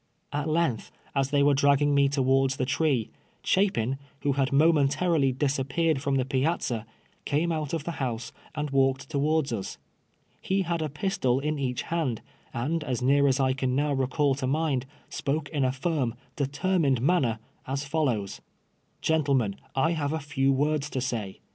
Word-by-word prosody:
At 145 +2 -1
length, 155 -8 0 0.2
as 135 -1 +1
they 145 0 +3
were 145 0 +5
dragging 140 +1 +3
me 140 -1 +4
towards 135 -1 +2
the 130 - -1
tree, 130 -4 0 0.3
Chapin, 135 - +1 0.2
who 145 - +1
had 135 -1 0
momentarily 145 0 +3
disappeared 140 +3 0
from 140 -1 0
the 130 -2 +1
piazza, 130 -4 -1 0.4
came 155 +4 0
out 155 -3 -2
of 165 -3 -2
the 170 - -3
house 115 -3 -3 0.2
and 150 -1 -3
walked 135 +2 +1
towards 150 0 +1
lis. 105 -5 -4 0.6
He 190 0 0
had 170 -1 -2
a 155 - -1
pistol 150 -5 0
in 150 +1 -2
each 125 -3 -2
hand, 155 -9 -2 0.3
and 150 +7 -2
as 125 -4 -2
near 140 +2 +4
as 135 0 +2
I 130 -1 +3
can 130 -1 -1
now 145 +1 +1
recall 135 +1 +1
to 130 -1 -3
mind, 140 -2 0 0.2
spoke 145 +1 -2
in 145 -4 -1
a 130 - +2
firm, 135 -3 -1 0.2
determined 145 -1 +1
manner, 130 -5 +2 0.3
as 135 +2 -2
fallows: 135 -10 -1 0.6
'• - - -41
Gentlemen, 140 -10 +1 0.2
I 155 +5 +2
have 150 -3 -1
a 160 - -1
few 140 -2 0
words 150 +2 0
to 130 - -3
say. 115 -6 -4
140 Hz, 170 wpm, -27 LUFS, 130-155 Hz, 0.6 s, were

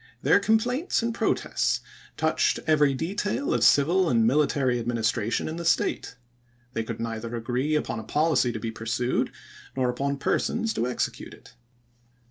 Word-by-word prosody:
Their - - +5
complaints 235 - +1
and 230 0 -1
protests - - 0 0.4
touched - - +1
every 150 -3 +3
detail 205 - -2
of 120 - +1
civil 165 +9 +4
and 115 -4 +3
military 130 -2 +2
adminis 115 -2 0
tration 110 +3 -2
in 160 +1 -5
the 170 - -5
State. - - -4 0.6
They 115 - -1
could 110 0 -6
neither 115 +1 -4
agree 125 +6 -1
upon 150 - -2
a - - -7
policy 150 -2 +1
to - - -5
be 115 - -4
pursued 115 +3 -1 0.4
nor 130 -2 +1
upon 140 +3 -2
persons 225 +9 0
to 120 - -1
execute 125 - -3
it. - - -19
130 Hz, 155 wpm, -26 LUFS, 115-165 Hz, 0.6 s, Their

